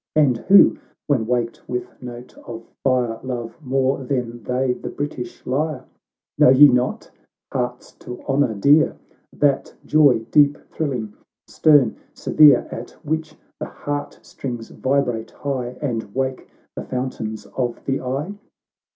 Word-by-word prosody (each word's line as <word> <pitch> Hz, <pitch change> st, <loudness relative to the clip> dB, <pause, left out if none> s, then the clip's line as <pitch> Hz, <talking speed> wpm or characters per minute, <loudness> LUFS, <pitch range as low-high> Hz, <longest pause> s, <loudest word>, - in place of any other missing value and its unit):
And 145 Hz, -5 st, +4 dB
who, 195 Hz, +11 st, +6 dB, 0.3 s
when 125 Hz, -7 st, +1 dB
waked 120 Hz, -1 st, -2 dB
with 125 Hz, 0 st, -5 dB
note 125 Hz, 0 st, -9 dB
of 115 Hz, -1 st, -7 dB, 0.2 s
fire, 125 Hz, -4 st, +1 dB
Love 120 Hz, -3 st, -5 dB
more 135 Hz, 0 st, 0 dB
than 125 Hz, -3 st, -3 dB
they 125 Hz, +3 st, 0 dB
the -, -, -7 dB
British 145 Hz, -4 st, -6 dB
lyre? 140 Hz, 0 st, -2 dB, 0.3 s
— -, -, -70 dB
Know -, -, +7 dB
ye 135 Hz, +3 st, +9 dB
not, 125 Hz, -1 st, 0 dB, 0.2 s
— -, -, -28 dB
hearts 125 Hz, -1 st, -3 dB
to 125 Hz, 0 st, -8 dB
honour 135 Hz, -5 st, +1 dB
dear! 145 Hz, +10 st, +4 dB, 0.3 s
That 140 Hz, -2 st, 0 dB
joy, 140 Hz, -7 st, +4 dB
deep 145 Hz, -1 st, +5 dB
thrilling, 125 Hz, -9 st, -3 dB, 0.3 s
stern, 145 Hz, -7 st, +3 dB, 0.2 s
severe, 145 Hz, -5 st, +5 dB
At 120 Hz, -, -6 dB, 0.2 s
which 155 Hz, +1 st, -2 dB, 0.2 s
the -, -, -4 dB
heart 145 Hz, 0 st, -5 dB
strings 120 Hz, -4 st, -7 dB
vibrate 130 Hz, -4 st, -1 dB
high, 125 Hz, -3 st, -4 dB
And 115 Hz, -7 st, -3 dB
wake 130 Hz, -1 st, -2 dB, 0.3 s
the -, -, -5 dB
fountains 125 Hz, -4 st, -4 dB
of 120 Hz, -2 st, -3 dB
the 135 Hz, 0 st, -1 dB
eye 135 Hz, +9 st, -3 dB
130 Hz, 140 wpm, -21 LUFS, 120-145 Hz, 0.3 s, ye